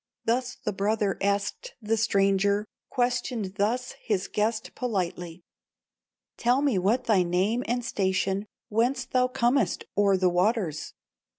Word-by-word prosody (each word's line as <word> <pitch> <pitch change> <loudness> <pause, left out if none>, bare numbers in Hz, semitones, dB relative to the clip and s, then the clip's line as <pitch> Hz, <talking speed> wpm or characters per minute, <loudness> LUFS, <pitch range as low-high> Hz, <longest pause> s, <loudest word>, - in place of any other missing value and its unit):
Thus 245 +2 0
the 210 - -4
brother 205 0 0
asked 200 - -1
the 225 -1 0
stranger, 200 -1 +2 0.2
Questioned 245 -5 -1
thus 240 +5 0
his 200 -4 -1
guest 220 +1 -1
politely: 180 -7 -3 0.9
'Tell 250 +4 +2
me 260 -10 +2
what 220 +8 +2
thy 215 -6 +3
name 185 +8 +1
and 240 +1 -1
station, 190 0 0 0.2
Whence 240 +4 +1
thou 250 0 +2
comest 245 -2 +1
o'er 200 -1 +4
the 185 0 +2
waters! 180 -2 0
210 Hz, 125 wpm, -27 LUFS, 195-240 Hz, 0.9 s, o'er